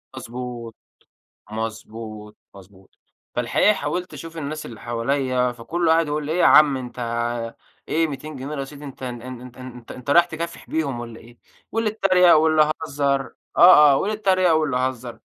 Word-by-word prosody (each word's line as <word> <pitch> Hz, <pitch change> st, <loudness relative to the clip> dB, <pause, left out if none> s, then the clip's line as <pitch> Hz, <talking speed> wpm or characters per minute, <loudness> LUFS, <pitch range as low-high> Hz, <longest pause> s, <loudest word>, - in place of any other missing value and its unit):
مضبوط، 120 Hz, -2 st, -7 dB, 0.8 s
مضبوط، 110 Hz, -1 st, -7 dB, 0.2 s
مضبوط. 95 Hz, 0 st, -18 dB, 0.4 s
فالحقيقة 120 Hz, -, +3 dB
حاوَلت 180 Hz, -3 st, -4 dB
أشوف 165 Hz, 0 st, -9 dB
الناس 155 Hz, +1 st, -5 dB
اللي 115 Hz, -, -10 dB
حوالِيَّا، 125 Hz, +1 st, 0 dB
فكلُّه 160 Hz, +8 st, 0 dB
قاعد 165 Hz, -1 st, +3 dB
يقول 150 Hz, 0 st, -2 dB
لي: 155 Hz, -, -2 dB
"إيه 175 Hz, -, -1 dB
يا -, -, +4 dB
عم، 150 Hz, -3 st, +6 dB
أنتَ، 125 Hz, -1 st, -8 dB, 0.9 s
إيه 165 Hz, +1 st, +2 dB
200 150 Hz, +1 st, -7 dB
جنيه 140 Hz, +4 st, -6 dB
رصيد، 140 Hz, +1 st, -7 dB
أنتَ 135 Hz, -2 st, -10 dB
أنتَ 120 Hz, -2 st, -5 dB
أنتَ 130 Hz, -1 st, -8 dB
أنتَ 125 Hz, -1 st, -12 dB
أنتَ 125 Hz, -2 st, -10 dB
أنتَ 130 Hz, +3 st, -7 dB
رايِح 175 Hz, +3 st, +6 dB
تكافح 170 Hz, +1 st, -7 dB
بيهم 140 Hz, -7 st, -2 dB
والّا 115 Hz, -1 st, -9 dB
إيه؟" 120 Hz, +1 st, -17 dB, 0.3 s
واللي 225 Hz, -1 st, 0 dB
اتريَّق 185 Hz, -4 st, +5 dB
واللي 155 Hz, -1 st, +4 dB
هزَر. 140 Hz, -2 st, -1 dB, 0.2 s
آه، 150 Hz, -5 st, +8 dB
آه، -, -, +4 dB
واللي 210 Hz, +7 st, -1 dB
اتريَّق 185 Hz, -4 st, +3 dB
واللي 155 Hz, -5 st, +1 dB
هزَر. 125 Hz, -2 st, -3 dB
135 Hz, 165 wpm, -22 LUFS, 120-160 Hz, 0.9 s, آه